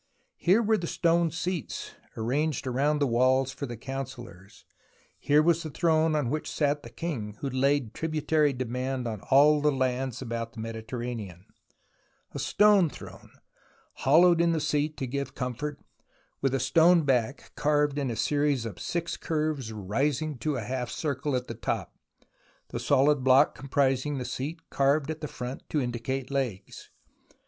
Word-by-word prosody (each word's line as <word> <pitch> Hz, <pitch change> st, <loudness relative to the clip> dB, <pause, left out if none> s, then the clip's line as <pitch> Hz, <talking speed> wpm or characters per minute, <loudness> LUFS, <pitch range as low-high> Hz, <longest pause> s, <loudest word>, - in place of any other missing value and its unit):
Here 195 Hz, +7 st, +3 dB
were 220 Hz, 0 st, +2 dB
the 170 Hz, -, -4 dB
stone 170 Hz, 0 st, +2 dB
seats 175 Hz, -1 st, -4 dB, 0.2 s
arranged 135 Hz, +6 st, -1 dB
round 140 Hz, +4 st, +1 dB
the 145 Hz, -, +3 dB
walls 130 Hz, +2 st, +2 dB
for 140 Hz, -, -6 dB
the 120 Hz, -1 st, -7 dB
councillors, 120 Hz, -6 st, -8 dB, 0.5 s
here 150 Hz, +1 st, +4 dB
was 170 Hz, 0 st, +3 dB
the 160 Hz, -, -5 dB
throne 160 Hz, 0 st, +2 dB
on 140 Hz, -5 st, 0 dB
which 155 Hz, -, -2 dB
sat 145 Hz, -1 st, 0 dB
the -, -, -10 dB
king 110 Hz, -11 st, -5 dB
who 140 Hz, -, -2 dB
laid 130 Hz, -2 st, +1 dB
tributary 155 Hz, -1 st, +1 dB
on 125 Hz, -3 st, -3 dB
all 145 Hz, +2 st, +6 dB
the 150 Hz, 0 st, +3 dB
lands 130 Hz, -2 st, -1 dB
about 115 Hz, -2 st, -4 dB
the 115 Hz, -, -10 dB
Mediterranean, 115 Hz, -4 st, -6 dB, 0.9 s
a -, -, -6 dB
stone 205 Hz, -5 st, +4 dB
throne, -, -, -12 dB, 0.7 s
hollowed 170 Hz, +5 st, +5 dB
in 170 Hz, 0 st, +3 dB
the 160 Hz, -, 0 dB
seat 150 Hz, 0 st, -1 dB
to 135 Hz, -, -2 dB
give 140 Hz, +2 st, -4 dB
comfort, 130 Hz, +3 st, -4 dB, 0.6 s
with 135 Hz, -1 st, +1 dB
a -, -, 0 dB
stone 165 Hz, +6 st, +5 dB
back 130 Hz, -1 st, 0 dB
carved 145 Hz, -1 st, +1 dB
in 135 Hz, -2 st, -1 dB
a 115 Hz, -, -3 dB
series 145 Hz, -2 st, +1 dB
of 110 Hz, -, -7 dB
six 170 Hz, -1 st, -2 dB
curves 155 Hz, -7 st, -2 dB
rising 135 Hz, +9 st, -1 dB
to 150 Hz, +1 st, -1 dB
a 125 Hz, -, -2 dB
half 125 Hz, +1 st, -3 dB
circle 145 Hz, -2 st, -2 dB
at 125 Hz, 0 st, -1 dB
the 115 Hz, -, -6 dB
top, -, -, -3 dB, 0.8 s
the 120 Hz, -, -4 dB
solid 140 Hz, +3 st, +3 dB
block 130 Hz, +3 st, +5 dB
com 140 Hz, -, -11 dB
prising 135 Hz, +1 st, +1 dB
the 125 Hz, -, -4 dB
seat 140 Hz, +7 st, -5 dB
carved 140 Hz, +2 st, +2 dB
at 155 Hz, 0 st, -7 dB
the 150 Hz, -, -3 dB
front 125 Hz, -1 st, -6 dB
to 150 Hz, -, 0 dB
indicate 125 Hz, +2 st, -3 dB
legs. 120 Hz, -9 st, -4 dB
140 Hz, 160 wpm, -28 LUFS, 125-155 Hz, 0.9 s, all